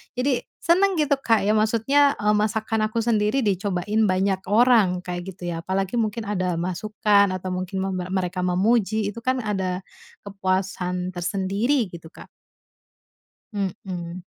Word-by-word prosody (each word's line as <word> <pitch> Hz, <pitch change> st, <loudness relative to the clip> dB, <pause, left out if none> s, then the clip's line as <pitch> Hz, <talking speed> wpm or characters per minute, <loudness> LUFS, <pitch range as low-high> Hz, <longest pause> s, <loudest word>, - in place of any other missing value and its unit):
Jadi, 255 Hz, 0 st, +1 dB, 0.2 s
senang 370 Hz, +4 st, +3 dB
gitu 300 Hz, -4 st, +1 dB
Kak 225 Hz, -5 st, +2 dB
ya, 210 Hz, +2 st, +2 dB
maksudnya, 235 Hz, +7 st, +3 dB
eee, 210 Hz, 0 st, +3 dB
masakan 220 Hz, +1 st, 0 dB
aku 225 Hz, +2 st, -1 dB
sendiri 225 Hz, +2 st, +1 dB
dicobain 205 Hz, +1 st, 0 dB
banyak 190 Hz, 0 st, 0 dB
orang, 210 Hz, -3 st, +4 dB
kayak 180 Hz, +1 st, -6 dB
gitu 175 Hz, -1 st, -6 dB
ya. 170 Hz, -, -3 dB
Apalagi 195 Hz, +4 st, -1 dB
mungkin 225 Hz, 0 st, -1 dB
ada 185 Hz, -3 st, 0 dB
masukan 200 Hz, +3 st, +1 dB
atau 185 Hz, 0 st, -4 dB
mungkin 185 Hz, +1 st, -3 dB
mem 190 Hz, -1 st, -2 dB, 0.2 s
mereka 180 Hz, -1 st, -1 dB
memuji, 210 Hz, +3 st, +1 dB
itu 205 Hz, -, -10 dB
kan 255 Hz, 0 st, +1 dB
ada 190 Hz, -4 st, -2 dB, 0.4 s
kepuasan 185 Hz, -2 st, -2 dB
tersendiri 195 Hz, +7 st, 0 dB
gitu 170 Hz, -1 st, -11 dB
Kak. -, -, -12 dB, 1.3 s
Mhm. 185 Hz, -3 st, -4 dB
200 Hz, 140 wpm, -23 LUFS, 185-220 Hz, 1.3 s, orang